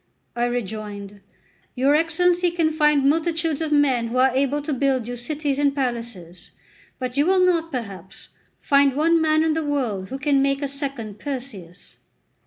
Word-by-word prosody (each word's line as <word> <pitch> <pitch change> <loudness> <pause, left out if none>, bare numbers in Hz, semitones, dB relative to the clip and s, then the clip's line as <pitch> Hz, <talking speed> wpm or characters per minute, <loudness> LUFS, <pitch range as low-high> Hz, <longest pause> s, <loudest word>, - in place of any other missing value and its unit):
I 240 0 0
rejoined: 205 -4 -5 0.5
"Your 270 +3 +3
Excellency 350 +3 +2
can 335 -2 0
find 300 -3 +3
multitudes 325 0 0
of 315 -1 -2
men 270 -5 +2
who 235 +2 -3
are 260 +1 +4
able 275 +3 0
to 295 - -2
build 265 -3 0
you 245 - -4
cities 285 +3 -2
and 285 -1 +2
palaces, 230 - -5 0.5
but 255 0 -5
you 290 +3 +3
will 370 -1 +4
not, 335 -2 +1
perhaps, 195 -8 -7 0.3
find 280 -2 +3
one 330 +3 +3
man 310 0 +3
in 320 -1 +1
the 320 0 -1
world 245 -10 -2
who 265 - -4
could 285 0 +1
make 275 +1 +1
a - - 0
second 270 -7 -5
Perseus." 245 - -8
275 Hz, 170 wpm, -22 LUFS, 240-310 Hz, 0.5 s, are